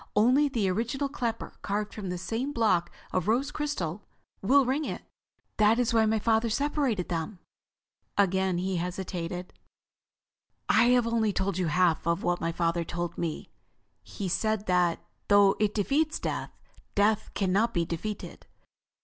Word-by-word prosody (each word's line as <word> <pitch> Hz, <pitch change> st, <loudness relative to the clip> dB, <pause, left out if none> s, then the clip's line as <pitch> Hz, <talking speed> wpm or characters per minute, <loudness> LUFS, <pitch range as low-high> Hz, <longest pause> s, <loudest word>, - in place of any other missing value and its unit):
Only 255 Hz, +7 st, +4 dB
the 230 Hz, -7 st, 0 dB
original 235 Hz, +9 st, -1 dB
clapper, 235 Hz, -5 st, -4 dB
carved 210 Hz, +1 st, -2 dB
from 200 Hz, -4 st, -5 dB
the 180 Hz, -, -3 dB
same 230 Hz, +10 st, -3 dB
block 205 Hz, -8 st, +2 dB, 0.2 s
of 185 Hz, -1 st, -1 dB
rose 260 Hz, +6 st, +1 dB
crystal, 210 Hz, -, -3 dB, 0.4 s
will 270 Hz, +7 st, +4 dB
ring 270 Hz, +5 st, 0 dB
it. -, -, -5 dB, 0.5 s
That 215 Hz, +1 st, +4 dB
is 245 Hz, -2 st, +1 dB
why 220 Hz, -1 st, +4 dB
my 220 Hz, +1 st, +2 dB
father 225 Hz, +1 st, +2 dB
separated 275 Hz, -, 0 dB
them." 170 Hz, +3 st, -3 dB, 0.8 s
Again 190 Hz, -2 st, +2 dB
he 185 Hz, +1 st, -1 dB
hesitated. 180 Hz, 0 st, -4 dB, 1.1 s
"I 225 Hz, -, +5 dB
have 245 Hz, 0 st, +4 dB, 0.3 s
told 190 Hz, -1 st, -1 dB
you 180 Hz, -, +1 dB
only 155 Hz, -, -1 dB
half 170 Hz, -3 st, +2 dB
of 170 Hz, 0 st, +1 dB
what 175 Hz, 0 st, 0 dB
my 165 Hz, +1 st, 0 dB
father 170 Hz, 0 st, 0 dB
told 175 Hz, +1 st, -4 dB
me. 165 Hz, -3 st, -4 dB, 0.5 s
He 200 Hz, -, -6 dB
said 210 Hz, +3 st, 0 dB
that, 180 Hz, -3 st, +1 dB, 0.2 s
though 205 Hz, -1 st, +5 dB
it 210 Hz, -1 st, +1 dB
defeats 290 Hz, +9 st, +1 dB
death, -, -, -3 dB, 0.5 s
Death 210 Hz, +1 st, +2 dB
can 190 Hz, -2 st, 0 dB
not 220 Hz, +5 st, +2 dB
be 170 Hz, -4 st, 0 dB
defeated. 200 Hz, +6 st, -6 dB
205 Hz, 155 wpm, -28 LUFS, 180-230 Hz, 1.1 s, I